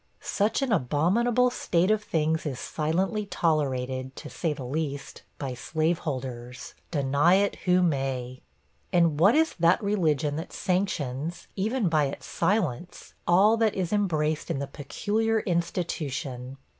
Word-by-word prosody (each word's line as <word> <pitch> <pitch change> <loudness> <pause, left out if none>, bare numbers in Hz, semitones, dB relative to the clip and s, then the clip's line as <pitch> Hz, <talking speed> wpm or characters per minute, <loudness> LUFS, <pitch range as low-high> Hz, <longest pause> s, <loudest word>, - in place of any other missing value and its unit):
Such 210 +6 0
an 265 - -1
abominable 215 - +2
state 180 -4 +1
of 215 -1 +1
things 160 -3 0
is 135 -4 -3
silently 190 +7 -1
tolerated, 130 -7 -1
to - - -9
say 165 - -1
the 140 -3 -5
least, 140 +1 -4 0.2
by 135 -3 -4
slaveholders 130 -5 -3 0.2
deny 145 +3 +3
it 200 +1 +1
who 180 0 +4
may. 135 -5 -1 0.5
And 170 -5 +3
what 200 +8 +6
is 320 +1 +3
that 170 +2 +4
religion 155 -8 +1
that 165 - -6
sanctions, 170 -5 -2
even 215 +2 0
by 155 -3 +3
its 135 - -5
silence, 180 - -1
all 200 +6 +5
that 220 -2 +2
is 185 0 -1
embraced 155 -7 0
in - - -1
the 140 - -2
'Peculiar 215 +11 -1
Institution? 140 -7 -3
165 Hz, 135 wpm, -27 LUFS, 140-195 Hz, 0.5 s, what